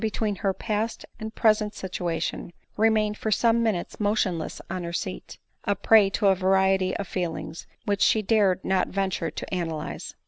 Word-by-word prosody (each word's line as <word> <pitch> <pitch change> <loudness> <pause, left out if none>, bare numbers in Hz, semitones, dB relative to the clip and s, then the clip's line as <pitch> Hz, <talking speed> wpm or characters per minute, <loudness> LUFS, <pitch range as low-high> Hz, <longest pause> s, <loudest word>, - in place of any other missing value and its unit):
149 220 - -1 0.2
between 195 - -10
her 195 -2 +2
past 215 +3 -3
and 220 0 -6
present 215 -1 +2
situation, 175 -3 -3 0.2
remained 215 -1 +2
for 220 - -3
some 230 +2 +3
minutes 215 -7 -1
motionless 205 -6 0
on 185 0 -4
her 170 - -4
seat, 185 +2 -5 0.3
a 205 - +1
prey 215 -2 +5
to 200 - -1
a 195 - +6
variety 190 0 +2
of 200 - -4
feelings 170 -2 -4 0.2
which 200 -1 0
she 220 - +4
dared 195 -3 +2
not 190 -1 +2
venture 190 -4 -1
to 155 - -6
analyse. 165 -4 -4
195 Hz, 170 wpm, -26 LUFS, 185-215 Hz, 0.3 s, a